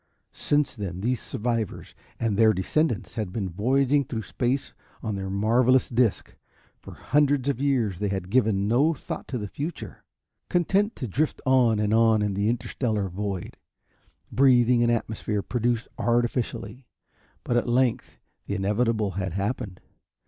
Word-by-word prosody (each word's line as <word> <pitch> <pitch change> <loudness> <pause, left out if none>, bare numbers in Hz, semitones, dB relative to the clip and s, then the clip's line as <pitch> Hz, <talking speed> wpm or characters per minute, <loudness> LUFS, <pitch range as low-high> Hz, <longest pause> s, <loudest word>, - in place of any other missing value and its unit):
Since 145 -2 0
then 95 -5 -5
these 120 +1 0
survivors 115 -3 -3 0.3
and 115 -3 0
their 110 +1 +5
descendants 115 - -1
had 105 -5 -3
been 100 -1 -2
voyaging 135 +9 +2
through 115 -2 -4
space 125 +7 -2 0.3
on 110 -3 -2
their 95 -1 -4
marvelous 115 +6 +3
disc. 120 -3 0 0.5
For - - -11
hundreds 145 -1 +1
of 135 -2 -2
years 120 -10 +1
they 105 - 0
had 95 -1 -3
given 110 -6 +2
no 140 +9 +3
thought - - -7
to 130 - -3
the 105 -3 -4
future, 150 - -6 0.5
content 195 +5 +1
to 130 - -4
drift 145 +10 -1
on 125 -4 +4
and 105 0 +1
on 110 -1 +4
in 105 -1 0
the 100 +3 0
interstellar 115 -3 -1
void, 95 0 -5 0.7
breathing 125 -2 +4
an 120 - +3
atmosphere 110 -3 -1
produced 120 -1 -1
artificially. 120 +1 -1 0.6
But 120 - -1
at 120 - 0
length 125 0 +1 0.3
the 100 - -2
inevitable 105 +1 0
had 95 -2 -3
happened. 100 0 -3
115 Hz, 150 wpm, -25 LUFS, 105-130 Hz, 0.7 s, their